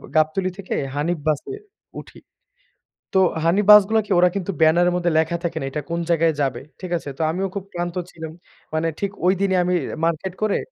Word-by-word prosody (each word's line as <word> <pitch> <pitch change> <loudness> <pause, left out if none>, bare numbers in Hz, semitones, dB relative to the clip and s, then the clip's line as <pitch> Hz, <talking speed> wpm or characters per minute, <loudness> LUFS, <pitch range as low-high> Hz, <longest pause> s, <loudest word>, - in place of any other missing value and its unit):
গাবতলী 155 +4 +2
থেকে 200 -2 -5 0.2
হানিফ 165 +4 -1
বাসে 155 - -1 0.5
উঠি। - - -13 0.9
তো 190 - +4 0.2
হানিফ 185 +5 +2
বাস 210 0 +11
গুলোকে 220 -2 0
ওরা 180 - +5
কিন্তু 195 0 -2
ব্যানার 160 +3 +5
এর - - -2
মধ্যে 175 -1 0
লেখা 165 +2 0
থাকে 170 -1 -2
না। 135 - -4
এটা 150 - -3
কোন 170 0 -2
জায়গায় 165 -1 +3
যাবে। 130 -3 -1 0.2
ঠিক 185 -2 -6
আছে? 150 - -8
তো - - -4
আমিও 190 +4 -2
খুব 200 - -3
ক্লান্ত 175 0 -3 0.2
ছিলাম। 160 -1 -8 0.4
মানে 160 +1 0
ঠিক 200 -1 -2
ঐ - - +4
দিনই 190 -2 +2
আমি 180 +1 +1 0.3
মার্কেট 170 +3 -2
করে 215 -2 +1
175 Hz, 195 wpm, -22 LUFS, 160-190 Hz, 0.9 s, বাস